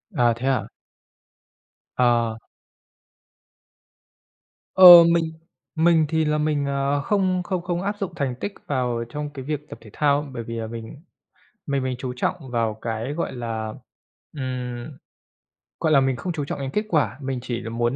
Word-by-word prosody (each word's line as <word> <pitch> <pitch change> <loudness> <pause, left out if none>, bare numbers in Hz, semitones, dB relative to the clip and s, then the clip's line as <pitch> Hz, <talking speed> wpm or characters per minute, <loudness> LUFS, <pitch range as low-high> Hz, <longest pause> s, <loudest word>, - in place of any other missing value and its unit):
À, 120 -4 +3
thế 125 +3 -4
hả? 135 -1 +1 1.3
Ờ. 120 -2 +2 2.4
Ờ, 190 - +8 0.3
mình 165 -1 +1 0.4
mình 165 -1 +4
thì 160 -1 +1
là 150 0 +1
mình, 150 -2 0
ờ, 140 +1 0
không 185 +1 +1
không 180 0 -2
không 175 0 -2
áp 200 +2 -2
dụng 195 -4 -4
thành 135 -6 -2
tích 200 +11 -5
vào 125 -4 -1
trong 145 +3 -5
cái 135 -2 -8
việc 150 0 -4
tập - - -8
thể - - -14
thao 145 -1 +2
á, 150 - -8
bởi 120 -2 -5
vì 115 - -7
là 115 -1 -4
mình 115 +5 -8 0.7
mình 140 -2 0
mình 130 -1 -2
chú 130 -1 -4
trọng 155 - 0 0.2
vào 115 -3 0
cái, 115 +4 -3
gọi 170 - -3
là, 115 -3 -4 0.6
ừm, 125 0 -5 0.8
gọi 160 - +1
là, 140 - +7
mình 135 -1 +1
không 180 +6 -4
chú 150 -3 -3
trọng - - -5
đến 135 -1 -3
kết 210 +6 -1
quả. 150 -7 +1
Mình 135 -1 -3
chỉ 120 -2 -3
là 115 - -6
muốn, 120 +2 -1
135 Hz, 175 wpm, -23 LUFS, 120-155 Hz, 2.4 s, Ờ